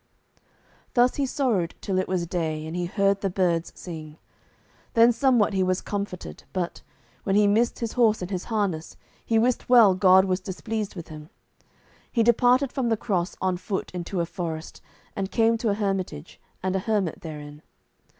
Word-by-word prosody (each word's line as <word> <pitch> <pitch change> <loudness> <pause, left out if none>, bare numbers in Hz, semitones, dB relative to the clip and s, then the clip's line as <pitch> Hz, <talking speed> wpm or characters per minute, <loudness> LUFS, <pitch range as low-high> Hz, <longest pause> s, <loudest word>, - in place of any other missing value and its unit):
Thus 245 0 +4
he 280 -2 +1
sorrowed 235 - 0
till 190 -2 -1
it 185 - -1
was 180 -2 -1
day, 160 -3 -2
and 160 +2 -6
he 180 0 -1
heard 200 +1 +1
the 195 - 0
birds 175 -3 0
sing. 155 -3 -8 0.8
Then 230 +1 +7
somewhat 240 -4 +3
he 190 - +1
was 185 0 +1
comforted, 200 -3 -5
but, 180 -2 -3 0.4
when 195 - 0
he 210 0 +5
missed 220 +4 +2
his 230 -2 -3
horse 225 -3 +3
and 180 - -6
his 185 -2 -3
harness, 200 -8 -2 0.3
he 225 - +1
wist 240 +2 +1
well 230 -6 +7
God 190 0 +5
was 185 -1 0
displeased 210 +3 -4
with 170 -3 -8
him. 155 0 -10 0.8
He 230 - +2
departed 245 +3 +4
from 260 -4 0
the 225 - +2
cross 185 -5 -1
on 185 -1 0
foot 190 +1 -4
into 180 0 -3
a - - 0
forest, 165 -3 -6 0.3
and 195 -1 -2
came 230 +1 +3
to 230 - 0
a 200 - +1
hermitage, 195 - -3 0.2
and 190 0 0
a - - +2
hermit 200 -4 -1
therein. 150 -2 -8
195 Hz, 180 wpm, -25 LUFS, 175-225 Hz, 0.8 s, Then